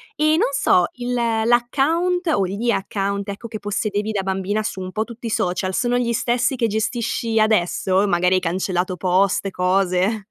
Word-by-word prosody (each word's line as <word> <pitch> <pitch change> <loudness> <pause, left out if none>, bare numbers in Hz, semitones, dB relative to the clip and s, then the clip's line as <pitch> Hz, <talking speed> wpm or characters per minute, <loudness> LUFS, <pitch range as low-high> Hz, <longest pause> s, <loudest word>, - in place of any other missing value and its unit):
E, 310 +1 +3
non - - +2
so, 180 -8 +3
il 245 0 -7
l'account 245 +10 +1
o 195 -12 +2
gli 215 +5 -2
account 200 0 -2
ecco, 205 +4 -6
che 215 -2 -6
possedevi 205 +1 -2
da 200 -2 -1
bambina 195 +2 -1
su 205 -3 -4
un 185 0 -5
po' 220 +2 -1
tutti 235 0 -11
i - - -2
social, 185 -1 -1
sono 245 +3 +1
gli 235 -1 0
stessi 240 +3 0
che 230 -2 +1
gestisci 225 +1 -1
adesso? 190 -2 +2
Magari 180 0 +2
hai - - +3
cancellato 185 +1 -1
post, 190 +2 +1
cose. 190 +3 0
205 Hz, 175 wpm, -21 LUFS, 190-235 Hz, -, E